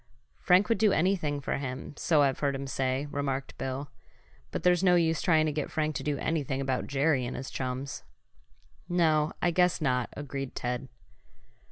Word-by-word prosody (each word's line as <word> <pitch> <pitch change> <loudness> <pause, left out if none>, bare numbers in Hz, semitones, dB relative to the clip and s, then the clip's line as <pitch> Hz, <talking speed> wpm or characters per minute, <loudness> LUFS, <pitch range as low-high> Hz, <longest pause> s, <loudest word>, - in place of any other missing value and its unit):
"Frank 185 +3 +4
would 230 - +1
do 215 -2 +4
anything 160 -5 +1
for - - -2
him, 130 0 -5
so 150 -1 +3
I've 135 -2 +1
heard 140 -2 0
him 135 0 -4
say," 135 +1 -1
remarked 140 -1 -3
Bill. 135 +2 -4 0.6
"But 160 - -4
there's 180 0 +4
no 180 -2 +5
use 165 -2 +2
trying 160 -3 +3
to 155 - 0
get 150 -1 -3
Frank 155 0 -1
to - - -6
do 145 -1 -1
anything 145 -3 -1
about 130 -2 -1
Jerry 140 -1 +2
and 120 - -4
his 130 - -6
chums." 130 +1 -4 0.9
"No, 160 -3 +3
I 175 - +3
guess 180 +1 +3
not," 125 -6 0
agreed 135 -2 -5
Ted. 125 +2 -3
145 Hz, 180 wpm, -29 LUFS, 135-160 Hz, 0.9 s, no